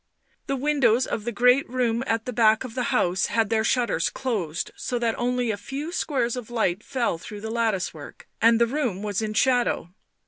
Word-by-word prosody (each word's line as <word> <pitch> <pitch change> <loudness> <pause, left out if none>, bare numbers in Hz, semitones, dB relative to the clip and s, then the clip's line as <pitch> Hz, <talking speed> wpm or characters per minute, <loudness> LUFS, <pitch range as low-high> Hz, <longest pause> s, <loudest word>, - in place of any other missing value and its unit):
The 275 - 0
windows 260 -4 +2
of 215 - -4
the 240 - -1
great 250 +5 +3
room 245 -1 0
at 225 0 0
the 250 - -4
back 220 -1 +4
of 250 -3 -7
the 250 0 -1
house 180 +2 +1
had 225 -1 0
their 220 -1 +2
shutters 235 -9 +1
closed 185 -11 -3
so 245 - -3
that 235 -1 0
only 245 -1 0
a 205 - -3
few 275 +10 -5
squares 260 -9 -1
of 245 -3 -7
light 215 -5 0
fell 240 -9 -1
through 205 +4 -9
the 220 +1 -5
lattice 225 -5 0
work, 150 -3 -12
and 230 0 +5
the 235 - +5
room 235 -7 -2
was 205 -1 -1
in 215 -1 -3
shadow. 245 -8 +1
230 Hz, 205 wpm, -25 LUFS, 215-250 Hz, -, and